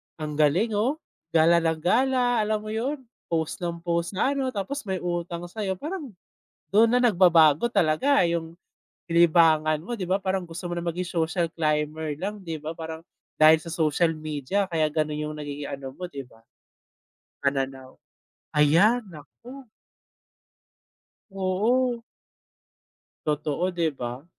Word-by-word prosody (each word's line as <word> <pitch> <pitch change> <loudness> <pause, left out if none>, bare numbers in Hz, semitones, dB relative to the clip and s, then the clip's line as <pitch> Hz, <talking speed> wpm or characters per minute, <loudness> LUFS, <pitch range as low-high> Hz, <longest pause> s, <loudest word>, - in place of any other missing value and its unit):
ang 155 -1 -5
galing 175 +10 +3
oh, 255 +7 +1 0.4
gala 170 +1 +4
ng 160 -1 0
gala 245 +5 +2
alam 215 0 0
mo 215 - -10
yun? 265 +6 -2 0.3
Post 160 0 -2
ng 170 -1 -2
post 170 0 0
na 270 +6 +2
ano, 265 -2 -1
tapos 230 +6 -4
may 190 -1 -1
utang 175 0 -3
sa'yo. 190 0 -3
Parang 310 -2 -5 0.7
dun 225 +2 +6
na 245 - +4
nagbabago 175 - +5
talaga 200 - +3
yung 170 0 -3 0.5
libangan 160 -2 +4
mo 240 +7 -5
di 190 - -2
ba, 190 +2 +1
parang 190 -1 -1
gusto 170 +2 -7
mo 175 - -3
na 170 - -5
maging 175 +1 -3
social 170 0 0
climber 155 -1 -1
lang 205 +2 -3
di 165 - -3
ba. 155 - -4
Parang 160 0 -6 0.4
dahil 155 +1 +8
sa 165 - -6
social 160 +1 +2
media 155 +5 -2
kaya 160 -2 +2
ganun 155 -1 -1
yung 150 0 -4
nagiging 145 -1 -5
ano, 135 -1 -6
mo 180 - -7
di 140 -6 -8
ba, 125 -3 -20 1.1
pananaw 135 -1 -2 0.6
ayan. 170 +12 +5
Naku. 240 - -13 1.6
Oo. 220 +6 0 1.3
Totoo, 150 +4 -1
di 170 -2 0
ba? 125 -1 -6
170 Hz, 145 wpm, -25 LUFS, 155-210 Hz, 1.6 s, dahil